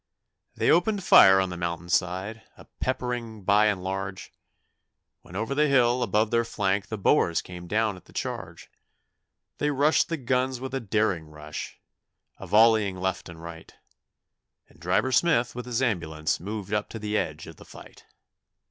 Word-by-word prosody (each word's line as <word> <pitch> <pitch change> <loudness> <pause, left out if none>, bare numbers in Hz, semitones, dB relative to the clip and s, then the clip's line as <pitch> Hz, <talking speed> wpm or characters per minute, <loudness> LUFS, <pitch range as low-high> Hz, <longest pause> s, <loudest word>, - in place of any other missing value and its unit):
They - - +2
opened 195 +4 +2
fire 95 - +7
on 95 -1 0
the 90 - -6
mountain 85 0 -4
side, 95 +5 -1 0.2
a - - -14
peppering 120 -4 -4
by 105 +2 +4
and 95 -3 -1
large, 95 0 -5 0.9
When 90 - -14
over 110 +6 -2
the 150 +2 +2
hill 125 -3 +3
above 110 -2 +1
their 115 0 +2
flank 100 -3 -1
the 110 - -5
Boers 85 -3 +2
came 90 -1 -10
down 110 +1 0
at 90 - -15
the - - -19
charge; - - -6 0.9
They 150 - +1
rushed 145 +2 +2
the 165 - -2
guns 130 -1 -1
with 130 +1 -6
a 135 - -1
daring 105 -7 -1
rush, 75 0 -8 0.6
a - - -9
volleying 110 -3 +4
left 95 -1 -3
and 85 -1 -11
right, 85 -1 -10 0.9
And - - -23
Driver 90 +9 0
Smith 130 -5 +2
with 125 0 -7
his 125 +1 -1
ambulance 80 -9 -1
moved 105 +2 -6
up 105 0 -1
to - - -7
the 105 -1 -3
edge 80 -6 -2
of 80 - -12
the - - -13
fight. - - -14
105 Hz, 170 wpm, -26 LUFS, 90-125 Hz, 0.9 s, fire